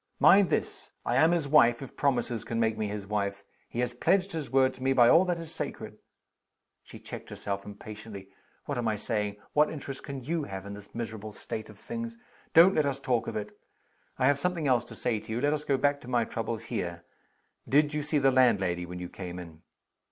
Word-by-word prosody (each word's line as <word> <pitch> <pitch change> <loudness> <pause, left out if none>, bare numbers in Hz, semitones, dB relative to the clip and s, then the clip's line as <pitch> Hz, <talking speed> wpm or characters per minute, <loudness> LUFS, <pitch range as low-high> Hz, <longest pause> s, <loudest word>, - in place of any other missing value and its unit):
"Mind 195 -1 +7
this! - - -2
I 120 - +1
am 160 +4 +6
his 170 -4 +1
wife, 130 -4 +5
if 135 - -11
promises 120 -5 0
can 115 - -3
make 110 -1 +2
me 110 -1 -2
his 105 -1 -5
wife! 100 -1 -2 0.3
He 120 - -2
has 125 0 -1
pledged 190 +10 +2
his 160 -7 -4
word 130 0 +3
to - - -15
me 135 +1 +2
by 120 -2 +6
all 170 +8 +6
that 175 -2 0
is 165 -1 -8
sacred!" 110 -7 -6 0.8
She - - -12
checked - - -9
herself 100 0 -4
impatiently. 105 -1 -9 0.4
"What 140 -4 -2
am 120 - -1
I 110 - +1
saying? 105 -1 -2 0.2
What 150 0 +4
interest 135 -3 -6
can 140 -3 -6
you 160 +2 -1
have 95 -1 -7
in 100 - -6
this 105 0 -12
miserable 110 -2 -5
state 110 +1 -6
of 110 - -13
things? 230 - -6 0.4
Don't 175 +4 +8
let 155 -4 +2
us 135 -1 -2
talk 125 -4 0
of - - -4
it! 105 - -6 0.6
I 130 - +2
have 140 +1 +4
something 175 -2 -1
else 120 -2 +3
to - - -11
say 115 -3 -1
to 110 - -10
you. 115 - -1
Let 145 +3 +2
us 150 -1 -2
go 140 - +2
back 145 +1 +1
to 125 - -12
my 120 -2 +1
troubles 115 0 -4
here. 85 -1 -4 0.7
Did 150 +2 +4
you 150 - 0
see 150 +1 0
the 135 -1 +4
landlady 95 -9 +3
when 90 +1 -7
you 90 0 -5
came 90 -1 -7
in?" 85 -3 -10
120 Hz, 225 wpm, -29 LUFS, 105-145 Hz, 0.8 s, Don't